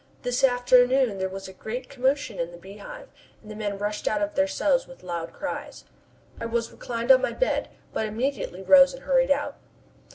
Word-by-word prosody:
This 245 +1 -1
afternoon 245 -3 +4
there 190 0 -1
was 195 0 -7
a 190 - -10
great 245 +6 -6
commotion 265 -3 -1
in 170 0 -1
the 175 - -11
Beehive, 200 - -11 0.3
and 215 - -11
the - - -7
men 205 -2 -3
rushed 210 +1 -3
out 295 - +1
of 305 0 -1
their 285 0 +2
cells 290 -2 +1
with 265 - -14
loud 170 -2 -4
cries. 290 - -6 0.6
I 230 - -3
was 230 0 -2
reclining 235 +1 -1
on 260 -1 +7
my - - -1
bed, - - 0 0.2
but 220 - -1
immediately 220 -4 -3
rose 275 +5 +7
and 265 - -13
hurried 265 -1 +3
out. 285 +1 0
245 Hz, 195 wpm, -25 LUFS, 205-270 Hz, 0.6 s, on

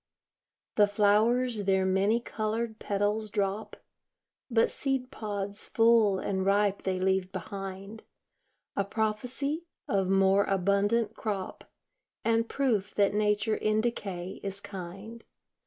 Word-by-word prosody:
The 205 -1 +6
flowers 215 +2 +2
their 190 -1 +3
many 195 +4 +2
colored 220 0 -3
petals 205 +2 -1
drop; 205 +1 -2 0.7
But 230 -2 +3
seed 265 -2 -2
pods 205 -3 -4
full 225 -3 +4
and 190 0 -1
ripe 200 0 +2
they 185 -1 -1
leave 190 0 +1
behind, 195 +3 -7 0.7
A 200 - +1
prophecy 245 - -2 0.2
of 195 -2 +1
more 195 +1 +4
abundant 200 +4 +1
crop, 200 -4 -4 0.6
And 230 0 +2
proof 220 -8 0
that 200 -1 +3
nature 210 +1 +1
in 215 0 +1
decay 195 -6 -4
is 195 0 -4
kind. 195 +5 -8
205 Hz, 115 wpm, -29 LUFS, 195-225 Hz, 0.7 s, The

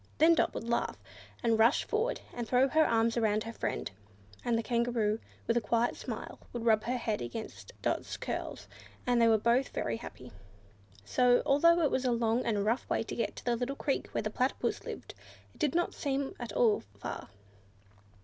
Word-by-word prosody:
Then 325 +2 +6
Dot 330 - +1
would - - -3
laugh, 235 - 0 0.5
and 225 -1 +2
rush 230 +6 +5
forward, 455 +3 -1
and 240 -2 -4
throw 255 +3 +4
her 315 +3 +4
arms 230 0 +2
around 215 -2 +2
her 230 - -6
friend; - - -3 0.5
and 235 -1 +1
the 225 - -1
Kangaroo, 235 -2 +1 0.3
with 230 - +1
a - - +2
quiet 230 +2 +1
smile, - - -6
would 235 -1 -5
rub 215 -2 +4
her 245 - 0
little 250 - -4
head 215 -2 0
against 120 - -7
Dot's - - -1
curls, - - -5 0.4
and 245 -1 +3
they 230 - +6
were 225 -1 +5
both 235 +5 +2
very 115 -1 -2
happy. - - -10 0.7
So, 245 - +4
although 335 +4 +5
it 295 - +2
was 260 - 0
really 240 -2 +2
a - - -5
long 230 +1 +2
and 205 -3 +1
rough 230 +4 0
way - - +1
to - - -6 0.3
the 240 -1 +2
little 250 +4 -2
creek 275 -1 -1
where - - -3
the 215 - -2
Platypus 255 +4 -1
lived, - - -7 0.4
it - - -22
did 305 -1 +1
not 345 - +1
seem 275 -1 -2
at 240 -3 -5
all 220 -1 +3 0.2
far. 100 - -6
235 Hz, 195 wpm, -31 LUFS, 225-260 Hz, 0.7 s, Then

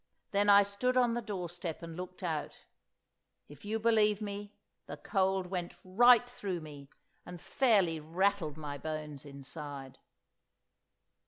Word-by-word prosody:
Then 205 0 +2
I 200 0 +8
stood 225 +6 -1
on 245 -2 +4
the 240 - -1
doorstep 180 -5 -5
and 165 -1 -7
looked 180 +1 -8
out—if 150 -2 -9
you 215 +2 -2
believe 215 -2 +3
me, 205 -1 -6 0.4
the - - -7
cold 190 -2 0
went 180 -1 -4
right 240 +6 +6
through 205 -8 -4
me, 145 -3 -11 0.3
and 175 0 -9
fairly 195 -7 +2
rattled 165 0 0
my 145 -2 -6
bones 155 -2 -5
inside. 140 -1 -7
185 Hz, 130 wpm, -32 LUFS, 155-205 Hz, 0.4 s, I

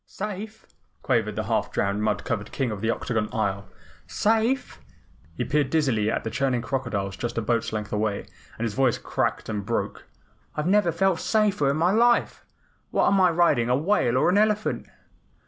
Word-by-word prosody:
"Safe!" 210 +2 -6 0.4
quavered 115 -5 +1
the - - -2
half - - -1
drowned 100 +1 0
and 105 - -2
mud 105 -1 0
covered 105 -3 -3
King 130 -4 -1
of 105 -2 -5
the 110 - 0
Octagon 110 -2 -1
Isle. 100 -3 -2 0.4
"SAFE?" 225 +5 0 0.6
He - - 0
peered 145 -2 +1
dizzily 130 -9 +1
at - - -1
the 110 - -4
churning 125 0 0
crocodiles 110 -6 -2
just 120 +3 -4
a - - +1
boat's 115 +1 0
length 105 -1 -4
away, 105 -1 0 0.4
and 115 - -2
his 110 - -2
voice 130 -1 +2
cracked - - -2
and 105 -2 -3
broke. - - -3 0.5
"I 150 - -1
never 190 +1 +3
felt 185 +1 +1
safer 210 -10 +2
in 140 - 0
my 170 +3 +3
life. 235 +3 +2 0.5
What - - +2
am 195 -1 +3
I 180 - +6
riding, 160 -8 +2
a 125 - +3
whale 145 - +2
or - - +3
an 200 - +4
elephant?" 215 0 0
130 Hz, 185 wpm, -25 LUFS, -, 0.6 s, I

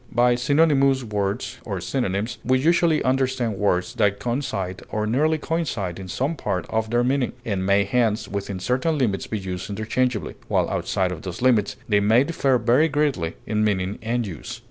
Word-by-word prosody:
By 120 +1 +4
synonymous 135 +1 +3
words 105 +1 -3
(or 100 -4 -4
synonyms) 105 +1 -2
we 130 0 +3
usually 165 +2 +3
understand 130 -4 0
words 90 -3 0
that 105 -5 +2
coincide 100 -8 -3
or 105 0 -1
nearly 150 +8 +2
coincide 130 - -2
in 95 - -7
some 135 - -1
part 90 -11 -2
of 110 0 0
their 120 +1 +2
meaning, 130 0 0
and 100 -4 -1
may 100 0 +4
hence 110 +1 +1
within 100 -1 -4
certain 130 - 0
limits 110 -8 0
be 110 - -2
used 95 -1 -5
interchangeably, 110 +3 -1
while - - +1
outside 95 -2 0
of 85 -3 -6
those 90 +5 -6
limits 115 -6 +3
they 105 -2 +3
may 110 +5 +4
differ 140 -4 +1
very 120 +7 +3
greatly 140 - 0
in 105 0 0
meaning 100 -2 0
and 115 +1 -1
use. 85 -8 -7
115 Hz, 175 wpm, -23 LUFS, 100-130 Hz, -, By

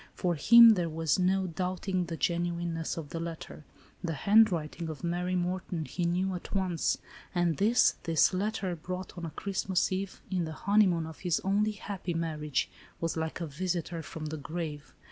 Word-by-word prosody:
For 175 -1 0
him 230 +9 +9
there 175 -6 +1
was 160 +1 0
no 190 +1 +2
doubting 185 +1 -2
the 165 -1 -5
genuineness 170 -1 -1
of 155 -3 -6
the 165 - -4
letter. 165 -2 -7 0.4
The 165 -3 -2
handwriting 175 -4 +3
of 155 +2 -7
Mary 175 +1 -1
Morton 180 -2 -2
he 175 +3 -3
knew 185 +2 0
at 180 +2 -6
once, 185 -4 +1 0.4
and 175 -3 +2
this, 225 +4 +4
this 165 +1 +3
letter, 190 -1 -1
brought 180 +3 -6
on 170 -2 -5
a - - -5
Christmas 190 +2 -1
eve, 190 0 -3
in 180 -3 0
the 160 - -5
honeymoon 185 -2 +3
of 160 0 -9
his 175 -3 0
only 205 +3 +1
happy 195 -4 -5
marriage, 155 -3 -1 0.3
was 165 -1 -1
like 160 +1 -3
a - - -1
visitor 170 +2 -3
from 160 0 -7
the 155 +1 -4
grave. 150 0 -5
175 Hz, 175 wpm, -30 LUFS, 165-185 Hz, 0.4 s, him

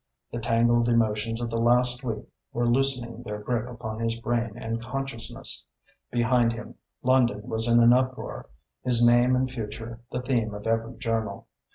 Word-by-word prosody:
The 120 - -3
tangled 120 +1 +3
emotions 115 0 +1
of 120 -1 -3
the 115 - -1
last 125 +2 +3
week 115 -3 -3 0.3
were 120 0 0
loosening 120 -2 +1
their 105 -3 -5
grip 115 +2 -2
upon 110 -2 -6
his 115 0 0
brain 115 -1 -2
and 115 0 -3
consciousness. 125 -2 -4 0.5
Behind 120 0 +2
him 115 - -8 0.3
London 125 -4 +3
was 110 +1 -1
in 120 0 +5
an 120 +1 +7
uproar, 130 0 -1 0.3
his 120 -2 +4
name 120 +2 +5
and 130 +1 +1
future 115 -1 -6
the 125 - -3
theme 115 -5 0
of 105 - -8
every 115 +1 -1
journal. 115 -2 -2
120 Hz, 165 wpm, -26 LUFS, 115-125 Hz, 0.5 s, an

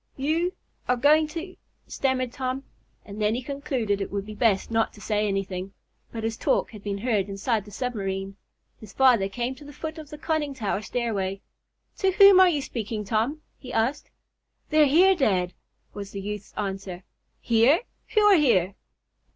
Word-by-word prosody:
"You 325 +6 0 0.3
are 250 - +2
going 305 +4 +4
to 335 +4 -7 0.2
" - - -45
stammered 255 -2 -1
Tom, 260 +1 -3 0.4
and 205 +1 -8
then 210 +1 +2
he 250 - -4
concluded 255 -7 -2
it 195 - -3
would 200 0 -3
be 215 - -8
best 210 -2 +1
not 225 0 +1
to - - -15
say 210 0 0
anything. 195 -1 -3 0.4
But 225 -1 -6
his 225 0 -2
talk - - 0
had 215 -3 -11
been 200 -1 -3
heard 205 -3 0
inside 205 +2 -1
the - - -12
submarine. 195 -5 -3 0.4
His 210 -3 -12
father 245 -7 +4
came 240 +5 -3
to 270 +3 -14
the 290 - -11
foot 315 +3 -6
of 305 -2 -10
the 300 - -8
conning 300 -2 -2
tower 210 -4 -2
stairway. 200 -5 -2 0.6
"To 385 - +2
whom 395 -1 +8
are 375 -1 +7
you 295 -5 -1
speaking, 220 -3 -4
Tom?" 235 +9 -1 0.2
he 255 - -9
asked. 250 +6 -1 0.6
"They're 305 -1 +5
here, 360 +7 +6
dad," 190 - +1 0.4
was 200 -1 -7
the 200 0 -6
youth's 210 0 -6
answer. 195 -3 -4 0.4
"Here? 235 - +4 0.3
Who 430 - +6
are 415 -2 +7
here?" 200 - +3
230 Hz, 180 wpm, -25 LUFS, 200-285 Hz, 0.6 s, whom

